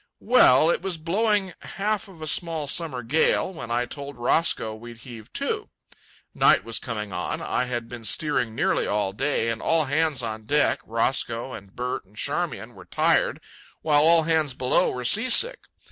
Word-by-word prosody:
Well, 165 - +5
it - - -1
was 185 -2 -3
blowing 195 +3 0
half 210 +1 -3
of 170 -5 -12
a - - -5
small 165 -2 -1
summer 140 -4 -1
gale, 155 +8 +1
when 160 -8 -8
I 120 +1 0
told 140 +2 -8
Roscoe 120 -2 0
we'd 120 +2 -11
heave 115 -4 -11
to. - - -3 0.6
Night - - +4
was 115 -1 -2
coming 105 -4 -5
on. 90 0 -3
I 125 - -1
had 120 -2 -4
been 120 -1 -9
steering 125 -3 0
nearly - - +1
all 100 -2 -1
day, 125 +3 0
and 115 -1 -3
all 165 -2 +2
hands 145 -2 0
on 110 -1 -5
deck 145 +5 +2
(Roscoe 115 +2 -1
and 95 -1 -11
Bert 125 +1 -3
and 100 +3 -24
Charmian) - - -3
were - - -14
tired, - - +1 0.4
while 150 -2 +4
all 165 +1 +5
hands 155 -4 +1
below 130 -1 +2
were 125 -1 -5
seasick. 255 - +4
135 Hz, 175 wpm, -24 LUFS, 115-165 Hz, 0.6 s, Well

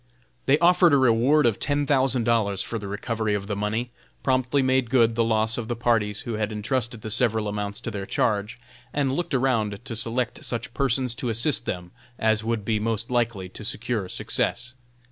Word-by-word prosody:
They 140 +2 +5
offered 175 -1 +5
a - - +6
reward 130 +4 +4
of 115 -4 +2
ten 145 0 +1
thousand 130 -3 +2
dollars 105 -4 +1
for 115 - -4
the 100 - -7
recovery 105 +1 -2
of 100 -1 -3
the 105 0 -3
money, 110 +4 -2 0.3
promptly 130 +1 +2
made 130 -2 +2
good 115 -2 +4
the 115 0 +2
loss 110 +1 +1
of 115 - -5
the 120 - -2
parties 115 -4 +1
who 120 - -5
had 110 0 -2
entrusted 115 +1 -2
the 110 - -4
several 110 -2 +1
amounts 105 0 -3
to - - -4
their 100 -1 -5
charge, 105 +1 0 0.3
and 140 -2 +1
looked 170 -3 -2
around 115 -6 +1
to 115 - -5
select 115 +2 -1
such 120 0 -2
persons 130 -2 0
to 120 +1 -3
assist 115 +1 0
them 90 -1 -4 0.3
as 110 -1 +1
would 115 -2 -2
be 110 -1 +1
most 115 +2 -2
likely 115 -6 0
to 100 - -10
secure 110 -3 -2
success. 125 +6 -1
115 Hz, 195 wpm, -25 LUFS, 105-130 Hz, 0.3 s, a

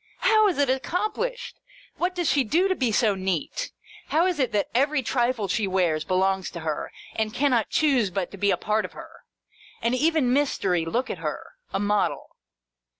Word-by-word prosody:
How 435 -1 +5
is 370 - 0
it 285 -1 +3
accomplished? 430 - -2 0.4
What 360 +1 -1
does 350 -3 -1
she 280 -2 +3
do 335 - +2
to 380 - +2
be 255 -10 0
so 215 -1 +3
neat? 190 - -3 0.4
How 325 +3 +2
is 360 -5 0
it 260 -3 +1
that 205 -1 0
every 275 +3 +2
trifle 240 -4 0
she 200 +2 0
wears, 175 -5 +1
belongs 190 +2 +1
to 170 - -6
her, 155 -2 -3 0.2
and 220 +1 -2
cannot 250 -6 +2
choose 270 -9 +2
but 185 -1 -3
be 200 - +2
a - - +2
part 215 0 0
of - - -7
her - - -12 0.6
1 - - -22
And 235 - +2
even 290 -2 +2
Mystery, 195 - +1
look 240 +10 -1
at - - -6
her! - - -5 0.2
A - - -1
model. 205 +1 -1
245 Hz, 190 wpm, -25 LUFS, 195-305 Hz, 0.6 s, How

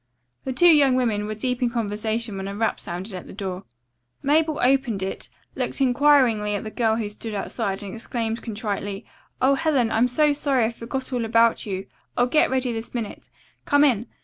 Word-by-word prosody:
The 265 - -2
two 260 +7 +2
young 275 -3 +4
women 220 -5 0
were 215 - -4
deep 250 +3 -2
in 245 - +2
conversation 220 -1 -2
when 195 0 -4
a 200 - -5
rap 225 +2 0
sounded 185 +4 -6
at 185 - -7
the - - -10
door. 190 -1 -5 0.6
Mabel 305 +2 +2
opened 250 -6 +2
it, 190 - -5 0.3
looked - - -2
inquiringly 255 -6 +3
at 205 - -3
the 215 - -6
girl 225 -2 +1
who 225 -2 -2
stood 210 +1 -6
outside 200 0 -3
and 195 - -7
exclaimed 230 0 -3
contritely: 205 -2 -4 0.4
"Oh, 270 +1 +5
Helen, 275 -6 +1
I'm 230 +3 +3
so 295 +4 +3
sorry 275 -4 +1
I 225 - -1
forgot 255 +3 -5
all 245 -2 0
about 230 0 +3
you. 190 -1 -4 0.3
I'll 245 - +4
get 275 +5 +3
ready 255 -2 0
this 225 +2 -6
minute. 230 -3 -5 0.4
Come 285 -1 +4
in. 240 -5 +2
230 Hz, 195 wpm, -24 LUFS, 210-260 Hz, 0.6 s, Oh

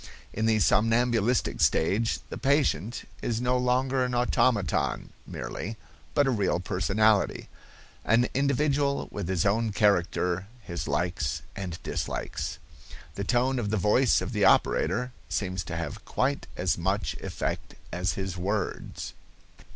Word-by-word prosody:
In 110 +1 0
the 110 -1 +4
somnambulistic 115 +2 +2
stage 105 +8 +2
the - - -4
patient 135 - +1
is 115 -1 -1
no 125 +1 +1
longer 130 +1 +2
an 125 -1 -1
automaton 120 -7 +1
merely, 110 +3 -5 0.4
but 145 - +4
a 135 - +2
real 100 -6 +1
personality, 100 +3 +1 0.5
"an 120 +2 +3
individual 140 +1 +1
with 100 -4 -4
his 95 -2 +1
own 110 +2 +2
character, 95 -2 +1 0.2
his 85 -3 -5
likes 75 -2 -1
and 90 -4 -4
dislikes." - - -3 0.6
The 100 - -4
tone 125 +4 +1
of 105 -4 -2
the 110 - +1
voice 105 +6 +3
of - - -4
the 105 -2 +1
operator 125 +5 +3 0.2
seems 95 -3 -2
to 80 - -5
have 85 - -5
quite 140 +2 -1
as 90 0 0
much 95 -3 0
effect - - -4 0.2
as 90 +1 0
his 95 -2 -4
words. 100 +3 -3
110 Hz, 135 wpm, -27 LUFS, 95-125 Hz, 0.6 s, the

